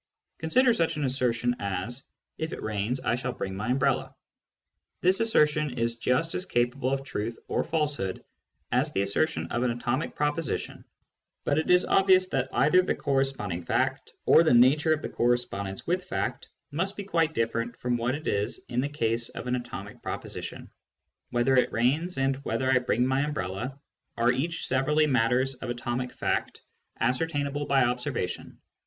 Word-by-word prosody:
Consider 240 +10 +4
such 165 -4 0
an 150 - -1
assertion 125 -2 +1
as, 100 +6 -3 0.2
" - - -58
If 160 0 -3
it - - -6
rains, 110 +4 -1
I - - 0
shall 125 +1 -2
bring 95 -1 -4
my 105 +3 -4
umbrella." 130 +2 +1 0.9
This 185 +3 +3
assertion 150 - +2
is 115 0 0
just 130 +8 +1
as 185 - -2
capable 125 -1 0
of 135 0 -1
truth 115 -3 -4
or - - 0
falsehood 150 - -1 0.5
as - - +2
the 95 - +1
assertion 100 - 0
of 120 - 0
an 125 - +2
atomic 120 +4 -2
proposition, 150 +1 -2 0.6
but 145 +1 +1
it 160 - -2
is 180 0 +5
obvious 185 -1 +4
that 130 -4 -1
either 165 +6 +4
the 185 - -1
corresponding 135 -10 -1
fact, - - -1
or - - +7
the 155 -7 +4
nature 140 +6 +5
of 155 0 +1
the - - -3
cor 120 - +1
respondence 100 -5 -3
with 180 +2 0
fact, 95 - -3 0.2
must 190 +7 -1
be 205 - -4
quite 165 -4 0
different 115 +1 -1
from 125 0 -1
what 120 +2 0
it 155 - -8
is 105 +3 -1
in 125 0 0
the 140 - -2
case 115 -5 0
of - - -7
an 125 0 0
atomic 120 -1 -7
proposition. - - -5 0.6
Whether 120 +2 +2
it 125 - +3
rains, 150 +10 +1
and 135 0 +1
whether 130 -2 -2
I 130 - +5
bring 125 0 +1
my 130 +1 +1
umbrella, 130 -3 -3 0.4
are 120 +1 +4
each 160 +7 -1
severally 150 +4 +2
matters 130 0 +2
of 125 - -7
atomic 120 +1 -3
fact, - - -2 0.4
ascertainable 145 +2 0
by 135 -2 +4
observation. 125 0 -2
130 Hz, 175 wpm, -27 LUFS, 120-150 Hz, 0.9 s, or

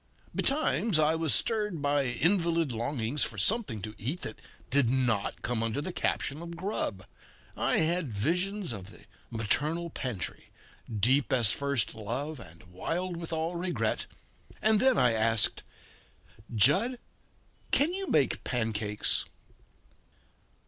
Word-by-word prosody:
Betimes 270 - +2
I 155 0 +4
was 160 -2 +1
stirred 210 -6 +2
by 145 -1 +1
invalid 165 +3 +1
longings 120 +3 -1
for 105 - -4
something 125 - 0
to 105 0 -5
eat 145 - -3
that - - -6 0.3
did 140 -3 +4
not 120 -5 0
come 120 -2 -1
under 115 +3 -1
the 170 +5 -4
caption 145 -2 -1
of 170 0 -7
"grub." 170 - -3 0.5
I - - +1
had 165 -3 +1
visions 180 - -1
of 100 -2 -8
the - - -15 0.3
maternal 150 +10 -1
pantry 125 - -5 0.4
"deep 125 +6 +2
as 120 -5 +5
first 140 -4 -1
love, 125 +8 -4
and 85 -6 -13
wild 165 - -3
with 170 0 -7
all 165 +2 -1
regret," 175 +1 -1 0.5
and 215 -1 +4
then 260 +2 +4
I 125 -2 +4
asked: 110 -1 +3 0.9
"Jud, 190 - +4 0.7
can 305 +5 +2
you 390 0 -3
make 140 - +2
pancakes?" 110 -3 -1
145 Hz, 130 wpm, -29 LUFS, 115-175 Hz, 0.9 s, as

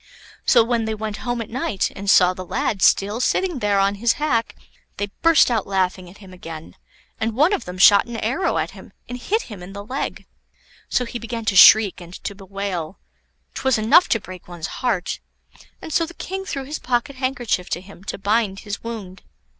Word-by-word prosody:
So 235 - +6
when 230 -1 0
they 220 0 -2
went 215 -1 -5
home 240 0 -3
at 220 - -15
night, 225 -6 -1
and 200 0 -4
saw 180 -2 +6
the 185 - -7
lad 220 +1 -2
still 205 +5 +3
sitting 355 +1 0
there 205 -2 +1
on 195 +1 +2
his 235 -1 +4
hack, 275 -7 -1 0.4
they 205 -1 -3
burst 330 -6 +5
out 225 -4 0
laughing 185 -2 -1
at 190 - -15
him 190 -3 -14
again, 165 -3 -9 0.4
and 220 0 -1
one 305 - +4
of 250 - -2
them 180 +1 -7
shot 200 +4 +6
an 235 -1 -6
arrow 270 - 0
at - - -1
him - - -14
and 245 0 -6
hit 435 - -1
him 210 -6 -10
in 180 +2 -10
the 200 0 -8
leg. 260 +5 -4 0.6
So 250 - +1
he 240 +1 -6
began 230 0 -5
to 210 -3 0
shriek 205 0 +7
and 175 +1 -11
to - - -4
bewail; 195 -3 -5 0.6
'twas 265 -3 +1
enough 220 +11 +5
to 225 - +2
break 185 -3 -11
one's 175 -2 -7
heart; 215 -8 -1 0.6
and 315 - -6
so 330 +1 +2
the 345 - -12
King 385 +1 -5
threw 275 -7 -4
his 295 +4 -6
pocket 250 +2 -1
handkerchief 250 -8 -1
to - - -2
him 190 0 -15
to - - -4
bind 205 0 0
his 205 -1 -6
wound. 210 -5 -7
215 Hz, 205 wpm, -21 LUFS, 195-245 Hz, 0.6 s, shriek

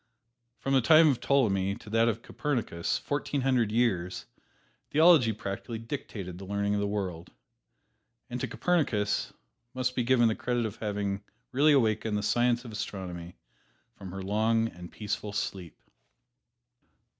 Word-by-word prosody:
From 135 - -2
the 135 - +5
time 155 +5 +7
of 135 - +1
Ptolemy 100 -8 +2
to 105 - -12
that 115 +1 +3
of 115 0 -1
Copernicus 115 -12 -2
fourteen 145 -1 -2
hundred 125 -5 +2
years 100 -6 0 0.6
theology 155 -6 +6
practically 105 +2 -5
dictated 110 -7 -6
the 95 - -8
learning 100 +1 -1
of 105 - +1
the 100 - 0
world. 95 -5 -3 1.0
And - - -5
to - - -1
Copernicus 110 - 0 0.4
must 125 0 -1
be - - +1
given 120 -1 +4
the 110 - +2
credit 120 0 -1
of 110 0 -5
having 100 -1 -2 0.3
really 145 +4 +4
awakened 110 -4 +2
the 105 - -2
science 120 +2 +2
of 115 - -8
astronomy 90 -5 -6 0.6
from 95 -2 -10
her 95 +1 -6
long 110 +3 +1
and 90 -3 -11
peaceful 105 -1 -4
sleep. 95 -4 -4
110 Hz, 145 wpm, -29 LUFS, 100-125 Hz, 1.0 s, time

